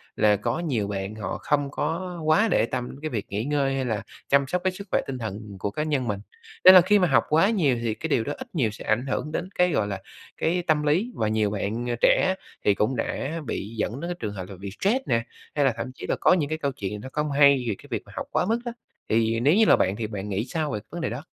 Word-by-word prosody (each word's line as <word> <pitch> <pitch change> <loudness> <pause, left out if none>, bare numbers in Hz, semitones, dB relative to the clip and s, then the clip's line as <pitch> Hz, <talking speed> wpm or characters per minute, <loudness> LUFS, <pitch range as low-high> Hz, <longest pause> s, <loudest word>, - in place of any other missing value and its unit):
là 105 -1 +4
có 115 +7 -2
nhiều 130 -12 -1
bạn 100 +1 -4
họ 110 - -4
không 145 -1 0
có 170 +5 -3
quá 155 +8 +4
để - - +3
tâm 125 0 -3
đến 135 - -10
cái 155 - -3
việc 110 -8 -3
nghỉ 105 +2 -2
ngơi 140 0 0
hay 135 -1 -1
là 110 -4 -2 0.3
chăm 140 0 +4
sóc 180 +5 -1
cái 185 - +2
sức 200 +2 -9
khỏe - - +3
tinh 135 - -4
thần 110 -3 -6
của 100 - -2
cá 150 +9 -2
nhân 145 -5 -1
mình. 100 -2 -1 0.4
Nên 185 - +11
là 185 - +10
khi 205 +4 +4
mà 180 - +3
học 135 - +4
quá 165 +6 +4
nhiều 165 - +2
thì 115 -2 0
cái 160 - -5
điều 120 -6 +2
đó 145 - -3
ít - - -8
nhiều 125 -9 +2
sẽ 105 - -10
ảnh 115 +4 +1
hưởng 150 +3 -2
đến 175 +3 -3
cái, 180 0 +3
gọi 110 -9 +1
là, 100 -2 -4 0.4
cái 175 +2 0
tâm 155 -2 +3
lý, 175 +12 +1
và 110 - 0
nhiều 110 -1 +1
bạn, 105 +4 -3
à, 120 - 0
trẻ 185 0 +4 0.3
thì 105 - +5
cũng 110 +6 +1
đã 160 +5 -3
bị 105 -4 -4
dẫn 110 +4 -2
đến 170 +3 -4
cái 175 - -2
trường 105 -3 -4
hợp 95 -2 -6
là 100 - -8
bị 100 +1 -6
stress 210 +6 +3
nè, 115 -1 +1 0.3
hay 145 -2 +3
là 135 - +3
thậm 130 - -4
chí - - -8
là - - +1
có - - +4
những 155 -6 +1
cái 155 - -1
câu 140 -3 -1
chuyện 105 -4 -5
nó 130 - -8
không 150 -1 -1
hay 140 -2 +5
về 110 - 0
cái - - -16
việc - - -1
mà - - -15
học - - -4
quá - - +1
mức 225 +2 +1
đó. 240 - -2 0.4
Thì 115 0 +2
nếu 140 +6 +4
như 220 +1 +5
là - - +7
bạn 95 +1 +1
thì 110 0 -3
bạn 105 -1 -5
nghĩ 100 +3 -1
sao 155 +2 -2
về 105 - -2
cái - - -21
vấn 175 - -5
đề - - -1
đó? 125 +5 -5
135 Hz, 290 wpm, -25 LUFS, 110-160 Hz, 0.4 s, Nên